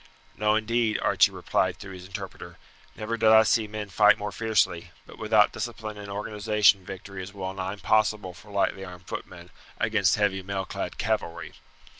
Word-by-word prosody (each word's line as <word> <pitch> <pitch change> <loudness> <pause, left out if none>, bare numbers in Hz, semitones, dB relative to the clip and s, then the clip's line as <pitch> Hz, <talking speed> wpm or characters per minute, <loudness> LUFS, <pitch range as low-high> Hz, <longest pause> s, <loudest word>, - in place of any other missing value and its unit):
"No, 105 0 +2
indeed," 110 0 +1
Archie - - +4
replied - - -1
through 95 - -9
his 90 0 -10
interpreter; 95 - -8 0.4
"never 115 +2 -3
did 110 -1 +4
I 110 0 +8
see 110 -1 +2
men 105 -1 -6
fight 105 +2 +5
more 105 0 -4
fiercely, 100 -6 0 0.2
but - - -14
without 110 -1 +4
discipline 110 -3 -5
and 100 0 -8
organization 105 -1 +2
victory 95 +1 -8
is 100 +3 -9
well 95 -1 -4
nigh 95 0 -4
impossible 105 -1 +1
for 95 +5 -16
lightly 100 -1 0
armed 90 -1 -10
footmen 85 0 -8 0.3
against 105 -4 +2
heavy 100 -3 +1
mailclad 95 0 -4
cavalry." - - -2
105 Hz, 165 wpm, -26 LUFS, 95-110 Hz, 0.4 s, I